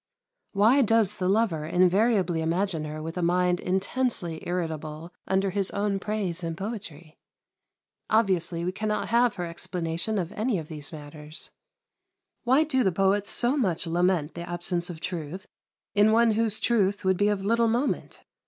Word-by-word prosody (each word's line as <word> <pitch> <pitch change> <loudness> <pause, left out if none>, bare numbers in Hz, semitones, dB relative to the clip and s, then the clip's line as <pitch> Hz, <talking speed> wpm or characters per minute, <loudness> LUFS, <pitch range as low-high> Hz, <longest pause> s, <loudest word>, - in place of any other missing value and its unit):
Why 220 +7 +5
does 225 -3 +2
the 185 0 0
lover 195 -7 +1
invariably 185 +1 +2
imagine 165 0 -1
her 155 +1 -6
with 165 +2 -6
a - - -1
mind 180 +1 +2
intensely 190 -3 -1
irritable 160 -1 -4
under 190 0 +1
his 195 0 -1
own 200 -1 -1
praise 195 -4 -2
and 165 -1 -3
poetry? 175 -7 -7 0.9
Obviously 180 -6 +1
we 180 - 0
cannot 210 +2 -2
have 235 -1 +3
her 175 - -3
explanation 170 +4 -3
of 180 -2 -2
any 220 0 -1
of 155 -2 -6
these 150 -3 -7
matters. 150 0 -8 0.9
Why 260 +5 +5
do 265 -5 +1
the 190 - +2
poets 195 +3 +1
so 245 +3 +3
much 190 - +1
lament 170 -2 +1
the 170 0 -7
absence 175 0 -2
of 165 -2 -8
truth 175 +1 -5 0.5
in 210 +1 +5
one 230 +1 +4
whose 220 -1 0
truth 205 -4 +1
would 190 0 +3
be 205 - +3
of 200 -2 -1
little 230 +2 +3
moment? 240 +5 -1
185 Hz, 160 wpm, -26 LUFS, 170-215 Hz, 0.9 s, Why